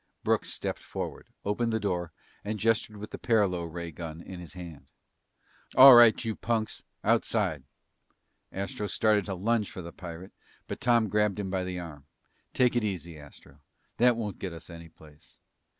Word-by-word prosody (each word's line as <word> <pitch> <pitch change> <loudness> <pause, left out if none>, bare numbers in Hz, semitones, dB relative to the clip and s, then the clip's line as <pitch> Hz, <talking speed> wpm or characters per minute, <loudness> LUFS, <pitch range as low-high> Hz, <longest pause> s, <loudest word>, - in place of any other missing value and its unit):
Brooks - - +1
stepped - - -4
forward, - - -6 0.2
opened 115 +3 0
the 110 - 0
door, 90 -5 -2 0.3
and 105 +1 -3
gestured 110 0 +1
with 105 +1 -8
the - - -7
paralo 100 -7 +1
ray 85 0 -6
gun 80 0 -7
in 90 +1 -9
his 85 - -10
hand. 85 -4 -10 0.9
"All 135 0 +11
right, 120 -1 +7
you 110 -1 -2
punks! 110 -2 -2 0.2
Outside!" 105 - +1 0.9
Astro 100 +2 -4
started 105 0 +2
to 95 - -3
lunge 105 +3 0
for 90 - -8
the 85 - -9
pirate, 85 +1 -9 0.3
but - - -6
Tom 120 -2 +3
grabbed 105 -1 +1
him 100 -2 -3
by 95 -1 -1
the 90 0 -4
arm. 75 -5 -9 0.4
"Take 125 -1 +2
it 120 - +2
easy, 90 -5 -4
Astro. 70 -1 -15 0.4
That 125 0 +5
won't 105 -3 -4
get 95 -3 -5
us 85 +1 -10
any 85 0 -10
place." 75 -1 -18
100 Hz, 170 wpm, -28 LUFS, 85-110 Hz, 0.9 s, All